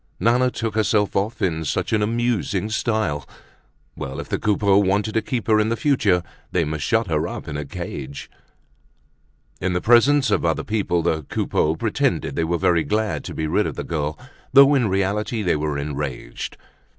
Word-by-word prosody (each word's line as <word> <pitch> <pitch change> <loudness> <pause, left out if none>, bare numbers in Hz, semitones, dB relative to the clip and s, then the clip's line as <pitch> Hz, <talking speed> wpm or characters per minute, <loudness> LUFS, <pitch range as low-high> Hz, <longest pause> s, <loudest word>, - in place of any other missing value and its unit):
Nana 120 +5 +3
took 115 -3 -3
herself 105 -1 +1
off 105 +4 -1
in 80 -4 0
such 75 - -2
an 110 - +2
amusing 110 -2 0
style. 110 - 0 0.7
Well, - - -6
if - - -7
the - - -1
Coupeaus 100 -1 +3
wanted 100 +3 0
to 110 - +2
keep 120 -4 -3
her 110 -1 +4
in 110 +1 +2
the 115 - +1
future, 105 - +2 0.3
they 90 - +2
must 75 -1 -3
shut 115 0 +2
her 80 -1 0
up - - -7
in 75 - -5
a 75 0 -3
cage. 70 0 -6 1.3
In 95 0 0
the 90 - +1
presence 125 +4 +4
of - - +2
other 80 -1 0
people 100 -6 0
the 80 -2 0
Coupeaus 80 +4 0
pretended - - 0
they 85 - 0
were 85 +1 0
very 85 0 +2
glad 105 -9 -1
to - - -6
be 80 - -2
rid 75 - +1
of - - -5
the - - -4
girl, 75 -1 -3 0.3
though 140 +1 +7
in 130 -5 +3
reality 100 +4 -1
they 90 - +2
were 75 -1 -2
enraged. 70 -4 -5
100 Hz, 185 wpm, -22 LUFS, 80-110 Hz, 1.3 s, though